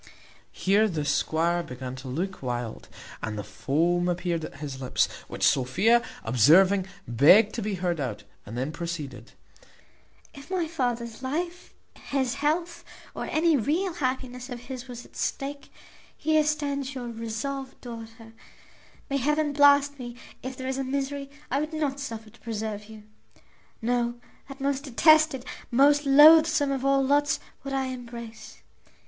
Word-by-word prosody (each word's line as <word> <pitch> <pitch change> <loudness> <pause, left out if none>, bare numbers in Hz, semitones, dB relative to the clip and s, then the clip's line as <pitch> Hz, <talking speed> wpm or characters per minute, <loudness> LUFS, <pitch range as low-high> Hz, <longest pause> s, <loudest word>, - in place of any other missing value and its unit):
Here 205 +3 +3
the 160 -7 -3
squire 170 +3 +1
began 130 -4 -7
to 130 +1 -9
look 180 +9 -3
wild, 120 -3 -4 0.3
and 110 -1 -4
the 105 - -4
foam 155 - 0
appeared 175 -2 -1
at - - -10
his 140 -3 -7
lips, 130 - +2 0.2
which - - +1
Sophia, 185 - +3 0.2
observing, 185 - +5 0.2
begged 180 - +6
to 235 - -3
be 205 -1 -2
heard 175 -2 -1
out, 125 -7 -4 0.2
and 110 +4 -8
then 130 +4 -2
proceeded: 160 -6 -6 1.0
"If 280 +2 -12
my 365 -3 0
father's 240 -7 -3
life, 340 +7 -4 0.2
his 265 -3 -2
health, 315 +5 -1 0.3
or - - -4
any 325 0 +2
real 320 - 0
happiness 255 -4 -3
of 245 -2 -6
his 260 0 -8
was 245 -1 -8
at - - -20
stake, 280 +1 -4 0.5
here 310 -1 +3
stands 285 -3 -2
your 245 -2 -5
resolved 235 +4 -5
daughter; 225 -1 -10 0.7
may 275 - 0
heaven 295 +2 +1
blast 285 0 +5
me 240 -1 -7 0.3
if 260 0 -6
there 260 - -5
is 265 0 -2
a - - 0
misery 275 +1 -3 0.2
I 275 - +2
would 305 +2 -3
not 290 -3 -1
suffer 225 -5 -6
to - - -21
preserve 215 -2 -4
you! 215 0 -12 0.8
No, 240 0 0 0.3
that 275 0 -9
most 275 +1 -1
detested, 310 0 +4 0.2
most 285 +3 +4
loathsome 310 +1 +7
of 270 -1 -2
all 275 0 +3
lots 285 +1 +2 0.2
would 275 0 -5
I 270 -1 0
embrace. 235 -3 -9
245 Hz, 150 wpm, -27 LUFS, 185-280 Hz, 1.0 s, loathsome